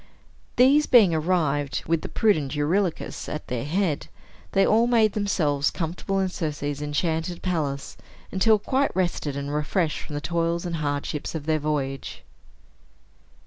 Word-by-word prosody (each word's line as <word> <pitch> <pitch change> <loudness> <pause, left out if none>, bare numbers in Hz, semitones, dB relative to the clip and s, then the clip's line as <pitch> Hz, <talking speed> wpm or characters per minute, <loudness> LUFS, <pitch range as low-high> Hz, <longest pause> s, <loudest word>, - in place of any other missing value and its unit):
These 280 +4 +5
being 215 -9 +6
arrived, 155 -4 0
with 165 -1 +1
the - - -6
prudent 155 -10 +1
Eurylochus 170 +4 -1
at 150 - -5
their 125 +1 -2
head, 165 -1 -1 0.5
they 195 0 +4
all 225 +2 +4
made 225 -3 +3
themselves 155 -9 +1
comfortable 185 +3 -3
in 190 - +1
Circe's 145 -4 -3
enchanted 160 +3 -2
palace, 150 -7 -2 0.3
until 215 +3 +4
quite 265 +6 0
rested 175 -6 -1
and 140 +1 -4
refreshed 155 +2 0
from 150 - -8
the - - -1
toils 170 +1 -1
and 170 -1 -2
hardships 145 +1 -3
of 150 -2 -4
their 155 0 +1
voyage. 140 -3 -3
165 Hz, 145 wpm, -25 LUFS, 145-190 Hz, 0.5 s, being